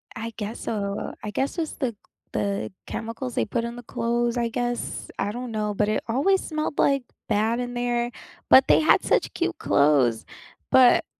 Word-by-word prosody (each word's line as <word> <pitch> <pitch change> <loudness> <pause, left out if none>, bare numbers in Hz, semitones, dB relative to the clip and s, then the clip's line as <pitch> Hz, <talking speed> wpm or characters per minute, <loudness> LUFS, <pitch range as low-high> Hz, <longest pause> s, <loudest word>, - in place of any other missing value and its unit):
I 230 0 -5
guess 215 +2 -5
so. 200 -2 -3
I 210 - -3
guess 270 +9 -2
it's 320 -2 -2
the 260 -4 -1
c - - -23 0.4
the 200 -1 -2
chemicals 230 +3 -5
they - - +2
put 235 - -2
in 235 0 -4
the 245 - -8
clothes, 235 +1 -1
I 235 -1 0
guess. 240 +1 -3
I 200 - -1
don't 245 +1 -5
know, 210 -1 -1
but 210 +1 +1
it 215 - 0
always 295 +12 +2
smelled, 310 -1 -3
like, 275 -1 +3 0.3
bad 220 +3 +1
in 245 0 -3
there. 240 0 -1 0.4
But 265 - +8
they - - +6
had 310 - +4
such - - +1
cute 345 -2 -1
clothes. 140 - +3 0.5
But, 255 -2 +6
235 Hz, 190 wpm, -25 LUFS, 215-250 Hz, 0.5 s, But